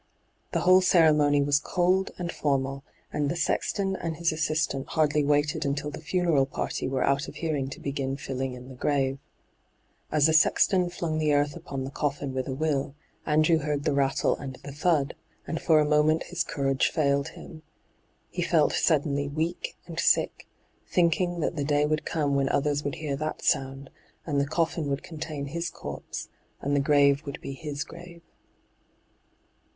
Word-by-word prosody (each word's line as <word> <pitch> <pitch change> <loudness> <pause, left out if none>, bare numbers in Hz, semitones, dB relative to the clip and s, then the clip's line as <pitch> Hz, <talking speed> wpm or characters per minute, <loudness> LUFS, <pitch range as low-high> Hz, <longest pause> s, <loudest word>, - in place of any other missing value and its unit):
The - - 0
whole 185 +1 +6
ceremony 150 -5 +4
was 145 0 +3
cold 180 +4 +1
and 175 -1 -3
formal, 135 -2 -1 0.3
and 145 -1 0
the 170 - -1
sexton 195 +2 0
and 165 -3 -4
his 170 0 +1
assistant 155 -3 -1
hardly 150 -1 +2
waited 150 +2 +1
until 140 +1 -2
the 155 - -8
funeral 165 -5 +2
party - - -3
were 130 0 0
out 140 +2 +1
of - - -9
hearing 150 -5 -2
to - - -8
begin 135 -1 -3
fiUing 135 -2 -4
in 125 0 -11
the - - -9
grave. 135 +1 0 0.9
As 150 -2 +4
the 160 - +4
sexton 180 +3 +4
flung 165 -3 -2
the 155 -1 +2
earth 145 0 +1
upon 135 -1 -5
the 135 - -5
coffin 140 -2 -2
with 130 -1 -2
a 135 - -2
will, 140 -2 -1 0.3
Andrew 155 +2 +4
heard 145 -1 -2
the 150 - +1
rattle 140 -1 +2
and 135 -2 -7
the 140 - -7
thud, 150 0 +1 0.3
and 165 - -4
for 155 -2 +4
a 150 - +3
moment 150 +1 +3
his 175 -2 -2
courage 135 -1 0
&iled 140 -1 +2
him. 160 -3 -11 0.7
He - - -3
felt - - +3
suddenly 145 -1 +1
weak 160 - -3
and - - -6
sick, - - +2 0.4
thinking 175 0 +1
that 160 - -1
the 145 - 0
day 145 +1 +2
would 155 0 -1
come 145 -3 0
when 135 -1 +2
others 145 +1 +1
would 145 - -2
hear 150 -3 -3
that 155 +2 -4
sound, 135 0 0 0.3
and 145 -3 +1
the 140 - -1
coffin 160 -1 -1
would 140 0 -2
contain 155 -3 -5
his 170 +4 -3
corpse, - - -7 0.3
and 140 +1 -1
the - - +3
grave 140 0 +4
would 140 - -5
be 135 - -6
his 145 0 -5
grave. 170 0 -12
150 Hz, 175 wpm, -27 LUFS, 140-160 Hz, 0.9 s, whole